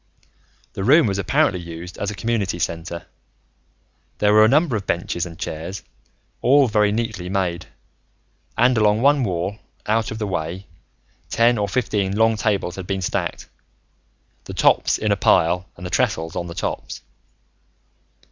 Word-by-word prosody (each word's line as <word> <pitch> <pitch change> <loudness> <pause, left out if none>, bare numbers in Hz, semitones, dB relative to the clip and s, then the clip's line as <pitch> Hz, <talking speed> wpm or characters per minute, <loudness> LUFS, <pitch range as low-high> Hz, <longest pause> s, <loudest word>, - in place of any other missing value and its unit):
The 95 - -4
room 145 +8 +6
was 100 -2 -1
apparently 90 -1 +1
used 85 +1 -8
as 100 - -2
a 105 - -5
community 105 -5 -1
center. 85 0 -4 1.1
There 105 0 +3
were 110 0 +7
a - - +6
number 150 -1 +3
of 100 -3 -4
benches 85 0 -2
and 85 -1 -11
chairs, 85 +7 -6 0.6
all 140 +2 +5
very 105 -2 +2
neatly 105 -5 -3
made; 90 -4 -2 0.9
and 125 -1 +4
along 105 +2 +3
one 140 -1 +4
wall, 95 +1 -2 0.3
out 110 +1 +1
of 110 - -5
the 110 - -2
way, 90 0 -4 0.6
ten 115 0 +3
or 100 -1 -1
fifteen 100 -5 -1
long 110 0 +4
tables 100 -4 -1
had 95 -2 -7
been 95 -1 -2
stacked, - - -3 1.0
the - - -8
tops - - +3
in 105 -1 -1
a - - +4
pile 90 -1 +2
and 90 - -9
the 90 - -5
trestles 80 0 0
on 85 - -3
the 85 - -8
tops. 90 - -4
100 Hz, 155 wpm, -21 LUFS, 90-110 Hz, 1.1 s, were